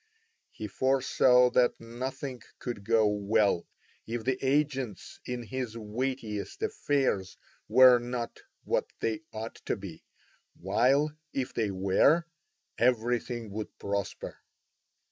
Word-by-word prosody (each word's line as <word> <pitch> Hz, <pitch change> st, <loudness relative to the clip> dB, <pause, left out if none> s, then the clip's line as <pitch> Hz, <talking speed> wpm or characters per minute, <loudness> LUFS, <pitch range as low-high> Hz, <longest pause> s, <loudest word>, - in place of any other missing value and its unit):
He 110 Hz, -, -7 dB
foresaw 125 Hz, +1 st, +4 dB
that 125 Hz, -1 st, +3 dB
nothing 130 Hz, +2 st, -5 dB, 0.2 s
could 120 Hz, -5 st, -5 dB
go 110 Hz, +1 st, +3 dB
well 105 Hz, -2 st, +2 dB, 0.4 s
if 115 Hz, 0 st, -3 dB
the 130 Hz, +2 st, -1 dB
agents 135 Hz, -5 st, -1 dB
in 125 Hz, -1 st, -3 dB
his 120 Hz, -1 st, -4 dB
weightiest 110 Hz, -1 st, -4 dB
affairs 130 Hz, -10 st, 0 dB, 0.3 s
were 125 Hz, +1 st, +8 dB
not 120 Hz, -1 st, -4 dB, 0.2 s
what -, -, 0 dB
they 115 Hz, +7 st, -1 dB
ought 110 Hz, 0 st, -6 dB
to -, -, +1 dB
be, 95 Hz, -5 st, -9 dB, 0.6 s
while, 145 Hz, +4 st, +2 dB, 0.2 s
if 130 Hz, -2 st, -2 dB
they 110 Hz, -3 st, 0 dB
were, 100 Hz, -, +3 dB, 0.5 s
everything 120 Hz, -1 st, +1 dB
would 105 Hz, +1 st, -6 dB
prosper. 100 Hz, -1 st, -4 dB
120 Hz, 110 wpm, -29 LUFS, 105-130 Hz, 0.6 s, were